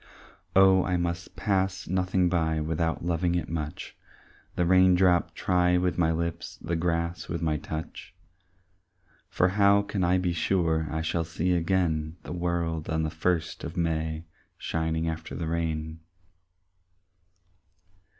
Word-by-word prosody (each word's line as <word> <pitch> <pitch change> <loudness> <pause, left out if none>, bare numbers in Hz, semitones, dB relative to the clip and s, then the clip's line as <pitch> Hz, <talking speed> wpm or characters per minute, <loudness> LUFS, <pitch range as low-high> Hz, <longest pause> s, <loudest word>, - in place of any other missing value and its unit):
Oh 95 -1 +6
I 90 -1 0
must 85 0 -3
pass 95 -3 -1
nothing 90 0 +1
by 80 -2 +1
Without 80 +1 -1
loving 85 0 0
it 85 - -1
much, 75 -2 -5 0.6
The 90 - +1
raindrop 90 0 +4
try 90 -1 +2
with 90 0 0
my 80 -2 +3
lips, 85 +1 -3
The 85 +1 -3
grass 85 0 -1
with 85 - -3
my 80 -2 +1
touch; 80 +2 -7 1.1
For 90 - +2
how 100 +1 +4
can 100 -2 -2
I 90 +1 +3
be 90 -1 0
sure 80 -2 +1
I 80 +1 -2
shall 85 +1 0
see 85 +2 -1
again 85 -3 0
The - - -6
world 85 -2 -2
on 80 0 0
the 80 - -2
first 85 0 -1
of - - -6
May 80 -1 -1 0.3
Shining 80 0 -2
after 80 0 -5
the 85 - -3
rain? 80 -1 -2
85 Hz, 140 wpm, -27 LUFS, 80-90 Hz, 1.1 s, Oh